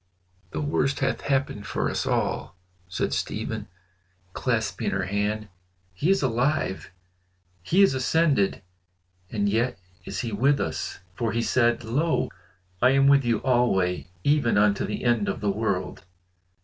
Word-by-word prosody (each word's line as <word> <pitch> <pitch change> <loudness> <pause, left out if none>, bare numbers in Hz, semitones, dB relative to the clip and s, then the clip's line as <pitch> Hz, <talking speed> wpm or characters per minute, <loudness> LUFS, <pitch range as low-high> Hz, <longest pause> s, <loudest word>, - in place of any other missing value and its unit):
"The - - -4
worst 140 -2 0
hath - - 0
happened 135 -7 -1
for - - -1
us - - -2
all," - - -1 0.3
said 90 - -2
Stephen, - - -3 0.7
clasping - - -1
her 95 -1 -1
hand. 105 +3 -1 0.5
"He 145 - -1
is 195 -5 +3
alive! 125 -4 0 0.7
He 180 - +4
is 195 - +4
ascended! 130 -6 +1 0.7
and 100 -2 0
yet 115 +2 +1 0.3
is - - -4
he 120 - -4
with 135 +7 +2
us, 80 +2 -3
for 110 +3 -2
he 115 0 0
said 120 -1 +2
'Lo, 130 +3 0 0.5
I 125 - +6
am 135 - +5
with 140 0 +6
you 115 -3 0
alway, 95 -10 +1 0.2
even 145 -7 +3
unto 105 -1 +3
the 105 - -4
end 120 -4 +2
of - - -2
the 105 -1 0
world! 100 -5 -2
115 Hz, 145 wpm, -25 LUFS, 100-135 Hz, 0.7 s, I